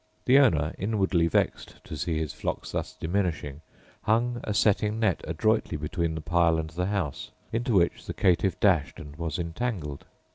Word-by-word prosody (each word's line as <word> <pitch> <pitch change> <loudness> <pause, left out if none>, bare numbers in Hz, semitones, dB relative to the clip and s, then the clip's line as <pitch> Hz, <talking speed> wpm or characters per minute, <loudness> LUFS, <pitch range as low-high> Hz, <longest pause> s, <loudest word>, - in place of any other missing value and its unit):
The 135 +2 +6
owner, 80 - +3
inwardly 95 -4 +1
vexed 85 - 0
to - - -7
see 80 -2 -2
his 80 -3 -2
flock - - -4
thus - - -4
diminishing, 80 -5 -2 0.4
hung 120 +2 +1
a - - -3
setting 105 +1 +2
net 110 -6 +1
adroitly 110 +1 0
between 80 +2 -2
the 80 - -4
pile 85 +1 +3
and 80 -1 -3
the 90 +3 -2
house, 95 -9 -2 0.2
into 115 0 0
which 85 -2 +2
the - - -3
caitiff 95 0 +2
dashed 90 -9 +2
and 75 0 -10
was 80 -3 -3
entangled. 85 - -3
85 Hz, 170 wpm, -27 LUFS, 80-105 Hz, 0.4 s, The